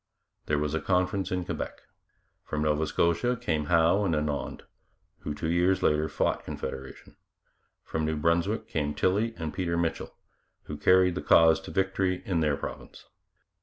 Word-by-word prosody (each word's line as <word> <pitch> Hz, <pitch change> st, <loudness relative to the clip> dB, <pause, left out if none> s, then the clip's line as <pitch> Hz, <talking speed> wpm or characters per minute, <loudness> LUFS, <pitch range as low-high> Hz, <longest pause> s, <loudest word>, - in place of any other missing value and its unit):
There 75 Hz, -, +1 dB
was 75 Hz, 0 st, -1 dB
a 80 Hz, -, -1 dB
conference 90 Hz, +1 st, 0 dB
in 90 Hz, -1 st, -1 dB
Quebec. -, -, -5 dB, 0.6 s
From 75 Hz, 0 st, -3 dB
Nova 75 Hz, 0 st, +1 dB
Scotia 85 Hz, +9 st, +1 dB
came 75 Hz, -2 st, -1 dB
Howe 85 Hz, +5 st, +3 dB
and 85 Hz, -5 st, +1 dB
Annand, 75 Hz, -1 st, -3 dB, 0.6 s
who 75 Hz, -, -5 dB
two 75 Hz, -, -3 dB
years 90 Hz, +2 st, +2 dB
later 75 Hz, +1 st, +2 dB
fought 75 Hz, -, -1 dB
Confederation; 65 Hz, 0 st, -7 dB, 0.7 s
from 80 Hz, -1 st, -2 dB
New 80 Hz, 0 st, -1 dB
Brunswick 85 Hz, +7 st, 0 dB
came 75 Hz, -2 st, -2 dB
Tilley 110 Hz, +5 st, +1 dB
and 80 Hz, -3 st, -4 dB
Peter 85 Hz, -3 st, -1 dB
Mitchell, 85 Hz, -1 st, -2 dB, 0.5 s
who 75 Hz, -, -7 dB
carried 90 Hz, +4 st, +4 dB
the 90 Hz, -, -4 dB
cause 80 Hz, -1 st, +5 dB
to -, -, -10 dB
victory 95 Hz, -1 st, 0 dB
in 90 Hz, -4 st, 0 dB
their 75 Hz, -3 st, +1 dB
province. -, -, -8 dB
85 Hz, 160 wpm, -28 LUFS, 75-90 Hz, 0.7 s, cause